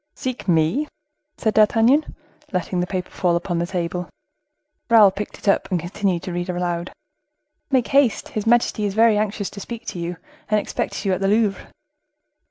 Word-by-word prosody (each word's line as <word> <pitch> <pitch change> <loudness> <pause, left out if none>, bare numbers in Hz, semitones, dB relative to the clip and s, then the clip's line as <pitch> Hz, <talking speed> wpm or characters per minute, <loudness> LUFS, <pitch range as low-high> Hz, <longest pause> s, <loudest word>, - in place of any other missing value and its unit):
"Seek 255 -4 -5
me!" 170 - +2 0.5
said 220 - 0
D'Artagnan, 225 +7 +3 0.4
letting 180 0 -1
the 180 - -1
paper 180 -1 -4
fall 175 -2 +1
upon 175 0 -1
the 170 - -1
table. 175 -1 -3 0.8
Raoul 215 -4 +7
picked 205 +2 -6
it - - -11
up, 195 - +2
and 180 - 0
continued 175 +1 -2
to 180 - -5
read 175 +1 -3
aloud:— 175 -1 -2 0.8
"Make 260 -4 +1
haste. 275 -5 +2
His 215 0 -4
majesty 230 -2 +2
is 200 -1 -2
very 225 0 +5
anxious 210 -1 -2
to 200 - -9
speak 235 +3 -7
to 180 - -6
you, 170 +1 -4 0.3
and 215 0 +3
expects 205 - -4
you 195 - +2
at 185 - -2
the 195 - +2
Louvre." 210 -1 +1
195 Hz, 180 wpm, -22 LUFS, 175-220 Hz, 0.8 s, Raoul